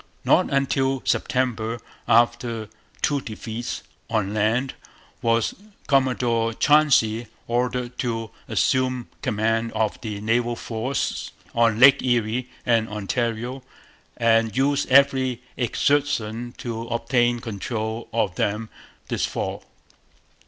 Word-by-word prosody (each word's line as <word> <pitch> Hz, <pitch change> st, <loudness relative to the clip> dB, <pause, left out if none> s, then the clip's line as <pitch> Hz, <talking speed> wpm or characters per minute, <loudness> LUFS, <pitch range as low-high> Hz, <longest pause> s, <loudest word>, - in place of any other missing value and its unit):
Not -, -, +4 dB
until 135 Hz, -1 st, +1 dB
September, 120 Hz, -3 st, 0 dB, 0.3 s
after 115 Hz, -1 st, +2 dB, 0.3 s
two 145 Hz, -2 st, +2 dB
defeats 115 Hz, +1 st, -5 dB, 0.3 s
on 105 Hz, -3 st, 0 dB
land, 115 Hz, +5 st, +1 dB, 0.5 s
was 115 Hz, 0 st, +2 dB, 0.3 s
Commodore 120 Hz, -4 st, +1 dB
Chauncey 120 Hz, -7 st, +4 dB, 0.2 s
ordered 125 Hz, +1 st, -1 dB
'to 115 Hz, -3 st, -2 dB, 0.2 s
assume 130 Hz, -2 st, +1 dB
command 115 Hz, +2 st, 0 dB
of 110 Hz, -1 st, -1 dB
the 105 Hz, -3 st, -4 dB
naval 120 Hz, +3 st, +1 dB
force 115 Hz, +4 st, -3 dB, 0.2 s
on 115 Hz, -2 st, +3 dB
Lakes 130 Hz, +2 st, +7 dB
Erie 120 Hz, 0 st, 0 dB, 0.2 s
and 115 Hz, -2 st, +2 dB
Ontario, 115 Hz, +4 st, -2 dB, 0.6 s
and 115 Hz, -1 st, +2 dB
use 140 Hz, +1 st, +2 dB
every 130 Hz, -2 st, +4 dB
exertion 120 Hz, -3 st, 0 dB
to 115 Hz, -1 st, -5 dB
obtain 120 Hz, 0 st, +1 dB
control 110 Hz, 0 st, -4 dB
of 105 Hz, -4 st, 0 dB
them 105 Hz, +2 st, -1 dB, 0.4 s
this -, -, -1 dB
fall.' -, -, -4 dB
120 Hz, 105 wpm, -24 LUFS, 110-130 Hz, 0.6 s, Lakes